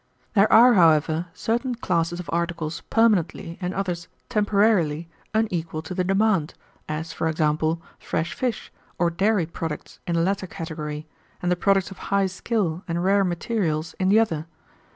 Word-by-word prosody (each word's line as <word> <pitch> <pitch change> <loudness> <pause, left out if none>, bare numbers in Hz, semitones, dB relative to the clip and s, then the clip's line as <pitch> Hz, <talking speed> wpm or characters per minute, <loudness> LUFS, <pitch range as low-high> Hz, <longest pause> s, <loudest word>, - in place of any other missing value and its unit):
There 205 -1 +4
are, 245 +2 +8
however, 160 -2 +4
certain 240 +6 -1
classes 175 -5 -1
of 180 - -7
articles 170 -2 -2
permanently, 200 -6 +1
and 180 0 -1
others 180 -3 -3 0.2
temporarily, 200 -8 +2 0.2
unequal 175 -8 -1
to 155 - -6
the 180 0 0
demand, 195 -4 +1 0.3
as, 155 +2 -4
for 165 - -1
example, 155 +1 +1 0.2
fresh 165 +1 -2
fish 250 -3 -3 0.2
or 175 -1 +2
dairy 195 +1 +2
products 160 -2 -6
in 170 - 0
the 165 - +2
latter 190 +1 -1
category, 155 -3 -6 0.3
and 180 - -1
the - - +4
products 195 0 +2
of 195 - -10
high 200 0 +3
skill 190 -2 -1
and 170 0 -1
rare 200 +1 +4
materials 170 -3 -1
in 185 0 +2
the 210 +3 +6
other. 165 -8 0
175 Hz, 155 wpm, -24 LUFS, 165-200 Hz, 0.3 s, are